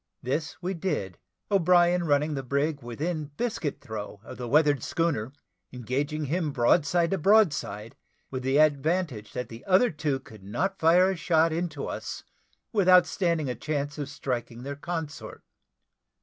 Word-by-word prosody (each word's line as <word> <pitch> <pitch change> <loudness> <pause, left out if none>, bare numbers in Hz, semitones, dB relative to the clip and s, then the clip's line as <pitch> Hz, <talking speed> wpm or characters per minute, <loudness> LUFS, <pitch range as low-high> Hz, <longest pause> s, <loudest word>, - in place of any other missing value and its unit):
This 150 +5 -2
we 185 +2 -1
did; 155 - -3 0.3
O'Brien 175 -2 +4
running 150 0 +2
the 135 - -2
brig 140 +3 -1
within 150 +7 -3
biscuit 220 - -2
throw 110 -5 -7
of - - -10
the 120 - -4
weather 145 +1 +4
schooner, 130 -5 -1 0.4
engaging 140 +5 -2
him 155 +1 -1
broadside 150 +6 +2
to 195 - 0
broadside, 150 - +2 0.4
with 130 -1 -3
the 135 +2 +1
advantage 150 - +1
that 125 -2 -4
the 115 +1 -10
other 195 +6 +4
two 145 -3 -1
could 110 -5 -15
not 190 - -2
fire 180 +4 +5
a - - -2
shot 165 -2 +2
into 160 -4 -3
us - - -5 0.5
without 185 -4 +6
standing 170 -5 0
a 125 - -1
chance 145 +3 -3
of 145 -1 -4
striking 125 -4 -4
their 140 +1 -5
consort. 160 0 -6
150 Hz, 150 wpm, -27 LUFS, 130-175 Hz, 0.5 s, without